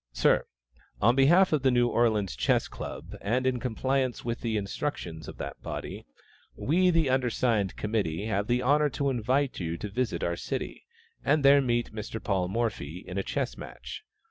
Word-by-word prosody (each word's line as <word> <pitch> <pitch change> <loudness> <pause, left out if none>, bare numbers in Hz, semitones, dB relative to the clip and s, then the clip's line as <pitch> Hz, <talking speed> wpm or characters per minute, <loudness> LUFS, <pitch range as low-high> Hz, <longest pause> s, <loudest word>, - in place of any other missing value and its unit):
Sir, - - +3 0.5
On 120 +4 +4
behalf 170 +7 +5
of 150 - +2
the 135 - +4
New 120 -1 +3
Orleans 110 - +1
Chess 60 0 +2
Club, - - -7
and 125 +5 0
in 130 -1 +1
compliance 130 +1 -1
with 115 0 -2
the 115 -3 0
instructions 100 - -4
of - - -8
that - - -6
body, - - -6 0.5
we, 180 +5 +2
the 165 -4 +3
undersigned 120 -6 +1
committee, 105 -4 -1
have 105 -1 -1
the 125 +1 +1
honor 150 +3 +4
to 140 0 -1
invite 130 +3 0
you 85 -2 -3
to 105 - -5
visit 120 +2 -1
our 85 - 0
city, - - -5 0.4
and 145 0 +2
there 140 +1 +7
meet 120 -3 0
Mr. 110 +1 -5
Paul 95 -4 0
Morphy 95 -6 -3
in 90 +2 -3
a - - -1
chess - - -2
match. - - -8
120 Hz, 175 wpm, -28 LUFS, 100-135 Hz, 0.5 s, there